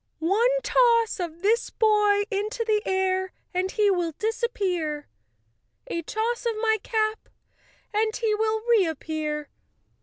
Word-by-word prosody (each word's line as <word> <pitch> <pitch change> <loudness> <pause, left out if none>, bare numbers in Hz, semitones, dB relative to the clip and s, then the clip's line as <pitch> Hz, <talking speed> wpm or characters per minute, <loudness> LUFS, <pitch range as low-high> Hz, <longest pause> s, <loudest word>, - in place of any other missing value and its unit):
"One 395 +10 +2
toss 465 -3 +3
of 340 0 -5
this 450 +4 +2
boy 420 -2 +3
into 425 +3 -2
the 430 -1 +2
air, 375 0 0 0.2
and 365 +1 0
he 415 0 +2
will 350 -3 -1
dis¬ 445 +9 -3
appear; 355 -11 -1 0.8
a 335 - -3
toss 465 +7 -2
of 460 - 0
my 440 -1 +2
cap 435 0 -1 0.6
and 435 +1 +1
he 450 -3 0
will 435 0 0
reappear. 315 - 0
420 Hz, 130 wpm, -25 LUFS, 360-445 Hz, 0.8 s, toss